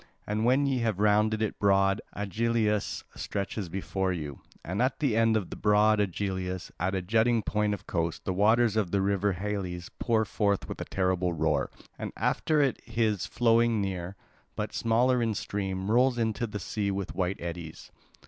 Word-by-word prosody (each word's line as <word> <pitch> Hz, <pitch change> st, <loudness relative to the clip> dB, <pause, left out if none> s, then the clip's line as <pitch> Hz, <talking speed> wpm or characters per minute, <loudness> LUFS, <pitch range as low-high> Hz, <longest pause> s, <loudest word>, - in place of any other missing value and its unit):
And 105 Hz, +2 st, -1 dB
when 130 Hz, +4 st, +4 dB
ye 135 Hz, -2 st, +1 dB
have 115 Hz, -5 st, 0 dB
rounded 105 Hz, +1 st, +3 dB
it 110 Hz, -, -3 dB
broad 100 Hz, 0 st, +3 dB
Aegialus 105 Hz, +1 st, 0 dB
stretches 100 Hz, -2 st, -4 dB
before 95 Hz, +1 st, -2 dB
you; 75 Hz, -6 st, -5 dB, 0.2 s
and 95 Hz, +7 st, -2 dB
at 130 Hz, +2 st, +1 dB
the 135 Hz, -7 st, +1 dB
end 115 Hz, -1 st, +4 dB
of 100 Hz, -5 st, -4 dB
broad 105 Hz, +1 st, +3 dB
Aegialus, 95 Hz, -2 st, -2 dB
at 95 Hz, +3 st, 0 dB
a 95 Hz, -, -1 dB
jutting 110 Hz, +3 st, +2 dB
point 105 Hz, 0 st, 0 dB
of -, -, -14 dB
coast, 85 Hz, -2 st, -2 dB
the 95 Hz, -, 0 dB
waters 110 Hz, +3 st, +3 dB
of 105 Hz, -5 st, +1 dB
the 100 Hz, -, +1 dB
river 100 Hz, +1 st, +1 dB
Halys 90 Hz, -2 st, -4 dB
pour 110 Hz, -2 st, +2 dB
forth 100 Hz, -1 st, 0 dB
with -, -, -6 dB
a -, -, -3 dB
terrible 90 Hz, -2 st, 0 dB
roar; 75 Hz, -3 st, 0 dB, 0.3 s
and -, -, -4 dB
after 155 Hz, -1 st, +1 dB
it 135 Hz, -, 0 dB
his 110 Hz, -4 st, 0 dB
flowing 115 Hz, -1 st, +3 dB
near, 95 Hz, -1 st, -3 dB, 0.4 s
but -, -, -3 dB
smaller 120 Hz, +2 st, +2 dB
in 115 Hz, -2 st, 0 dB
stream, 95 Hz, 0 st, -3 dB
rolls 125 Hz, +1 st, +4 dB
into 115 Hz, +1 st, 0 dB
the 105 Hz, -1 st, -5 dB
sea 100 Hz, +1 st, -2 dB
with 100 Hz, -1 st, -3 dB
white 95 Hz, +1 st, -1 dB
eddies. 85 Hz, -2 st, -7 dB
105 Hz, 175 wpm, -28 LUFS, 95-115 Hz, 0.4 s, when